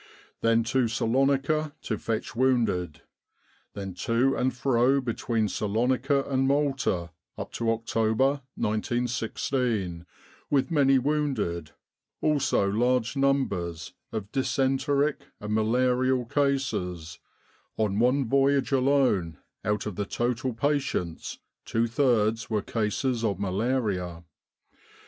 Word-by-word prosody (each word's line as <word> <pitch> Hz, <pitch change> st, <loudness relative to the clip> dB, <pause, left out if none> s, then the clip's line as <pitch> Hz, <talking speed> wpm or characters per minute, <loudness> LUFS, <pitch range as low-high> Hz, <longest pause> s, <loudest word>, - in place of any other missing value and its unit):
Then 115 Hz, 0 st, +3 dB
to 125 Hz, +1 st, +1 dB
Salonika 135 Hz, +6 st, +1 dB
to 110 Hz, -, -2 dB
fetch 115 Hz, +1 st, -3 dB
wounded. 115 Hz, -, +1 dB, 0.7 s
Then 95 Hz, -2 st, -5 dB
to 120 Hz, +8 st, +1 dB
and 130 Hz, +1 st, +1 dB
fro 130 Hz, +1 st, +2 dB
between 115 Hz, -3 st, -1 dB
Salonika 125 Hz, +7 st, +1 dB
and 135 Hz, -1 st, +1 dB
Malta 135 Hz, -, 0 dB, 0.3 s
up -, -, -6 dB
to 115 Hz, -1 st, -1 dB
October, 115 Hz, +4 st, +1 dB
1916, 110 Hz, -4 st, -1 dB, 0.4 s
with 140 Hz, +3 st, +1 dB
many 135 Hz, -3 st, +4 dB
wounded, 130 Hz, -, -1 dB, 0.5 s
also 145 Hz, -9 st, +2 dB
large 120 Hz, +4 st, +1 dB
numbers 100 Hz, -12 st, 0 dB, 0.2 s
of 105 Hz, -1 st, -5 dB
dysenteric 135 Hz, +2 st, +1 dB, 0.2 s
and 105 Hz, +1 st, -4 dB
malarial 125 Hz, +3 st, +2 dB
cases 115 Hz, -, -1 dB, 0.6 s
(on 105 Hz, -2 st, 0 dB
one 125 Hz, +3 st, +3 dB
voyage 140 Hz, +2 st, +2 dB
alone, 130 Hz, -, +2 dB, 0.3 s
out 105 Hz, 0 st, -1 dB
of 105 Hz, -4 st, -5 dB
the 100 Hz, -, -1 dB
total 120 Hz, +3 st, -1 dB
patients, 130 Hz, -, -2 dB, 0.3 s
two 115 Hz, +1 st, 0 dB
thirds 115 Hz, -3 st, +1 dB
were 105 Hz, -3 st, 0 dB
cases 115 Hz, +2 st, -1 dB
of 100 Hz, -4 st, 0 dB
malaria). 100 Hz, -4 st, -1 dB
120 Hz, 105 wpm, -27 LUFS, 105-135 Hz, 0.7 s, many